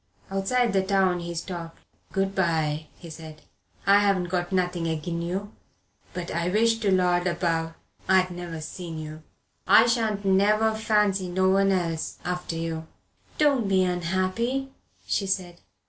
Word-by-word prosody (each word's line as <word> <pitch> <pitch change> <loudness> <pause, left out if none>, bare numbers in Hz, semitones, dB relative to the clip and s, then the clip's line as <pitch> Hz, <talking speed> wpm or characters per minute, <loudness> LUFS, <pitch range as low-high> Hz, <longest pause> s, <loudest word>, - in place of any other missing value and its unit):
Outside 215 +4 +1
the 195 - +3
town 190 -2 +2
he 170 0 -5
stopped. 170 -1 -6 0.3
"Good 195 0 0
bye," 160 -4 0
he 170 - -11
said. 155 -1 -10 0.4
"I 200 +1 +6
haven't 195 -3 +1
got 175 0 -1
nothing 180 -3 0
agin 165 +2 -3
you 190 +5 -3 0.6
but 180 -1 -5
I 170 +1 -1
wish 225 +3 +2
to 210 -3 0
Lord 180 -1 +2
above 165 -2 -1 0.3
I'd 185 -1 +4
never 175 -2 -6
seen 165 +1 -7
you. 155 0 -7 0.5
I 225 - +7
shan't 220 -4 0
never 210 +3 +3
fancy 210 -4 +1
no 185 +1 +2
one 195 0 +3
else 170 -4 -1
after 180 -1 -3
you." 165 -1 -4 0.5
"Don't 280 -7 +3
be 190 -1 +3
unhappy," 185 +9 -1 0.3
she 200 - -1
said. 180 -3 -2
185 Hz, 145 wpm, -26 LUFS, 170-200 Hz, 0.6 s, I